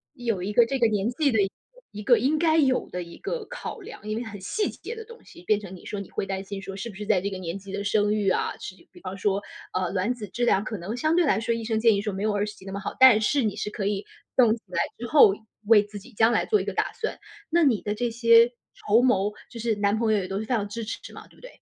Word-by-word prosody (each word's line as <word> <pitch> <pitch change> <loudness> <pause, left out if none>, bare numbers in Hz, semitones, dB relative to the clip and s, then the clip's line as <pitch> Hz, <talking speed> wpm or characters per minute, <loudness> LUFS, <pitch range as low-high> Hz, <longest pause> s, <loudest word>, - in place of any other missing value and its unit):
有 230 -8 -2
一 205 +2 -3
个 235 +1 +6
这 270 - -1
个 240 - +4
年 210 +1 0
纪 280 +2 +1
的 220 - +3
一 195 - +2
个 - - -17 0.4
一 210 - -7
个 240 +2 +5
应 295 +4 +1
该 320 -1 +3
有 265 -5 +2
的 180 0 -4
一 170 - -12
个 440 +3 -4
考 - - -7
量， 210 - -11
因 215 - -1
为 235 - -3
很 215 -3 -8
细 415 - -1
节 465 - -8
的 450 -1 -8
东 465 +1 -14
西 175 - -15
变 210 +3 +2
成 190 -2 -9
你 180 - -14
说 205 - -4
你 200 - -8
会 - - -3
担 195 0 -4
心 195 0 -6
说 195 0 -7
是 195 +4 -5
不 205 - -11
是 210 +2 -6
在 205 -4 +2
这 200 - -2
个 190 - -6
年 175 0 -5
纪 195 0 -11
的 200 - -3
生 205 0 +2
育 205 -2 +1
啊， - - 0
是 190 - -8 0.2
比 - - -16
方 190 0 -6
说。 195 0 0 0.3
呃， 185 -1 0
卵 195 +5 0
子 225 -4 -8
质 240 +6 -2
量 200 -4 +3
可 215 - -4
能 190 +6 -5
相 310 +6 +1
对 350 - +4
来 220 -8 +2
说， 230 +1 0
医 230 - -4
生 220 0 0
建 225 -1 +5
议 200 - 0
说 210 -1 -3
没 195 +2 -4
有 215 - +2
20 205 +1 -1
几 190 - -16
那 195 - -7
么 200 - -4
好， - - -5
但 255 -5 +8
是 280 +6 +2
你 210 - -1
是 - - -3
可 210 -2 -4
以 200 0 -1 0.3
冻 235 -4 +5
起 230 - -15
来 180 - -1 0.2
之 240 - -5
后 235 -7 +7 0.3
为 210 -1 +6
自 205 0 -10
己 - - -15
将 225 +3 +4
来 225 - +1
做 425 -2 +2
一 - - -3
个 - - -3
打 - - 0
算。 455 - -4 0.3
那 340 +1 +3
你 250 -8 +3
的 210 - -2
这 240 +2 -1
些 230 0 +6 0.2
筹 215 +3 +3
谋 210 -5 +2 0.2
就 235 - -9
是 225 -1 0
男 205 +1 +1
朋 225 -2 +2
友 210 - +3
也 185 - -4
都 195 +1 -3
是 220 - -4
非 250 - -2
常 205 -3 -1
支 230 +3 -5
持 220 - -7
嘛， - - -11
对 - - -23
不 - - -21
对？ - - -11
215 Hz, 330 characters per minute, -25 LUFS, 200-240 Hz, 0.4 s, 但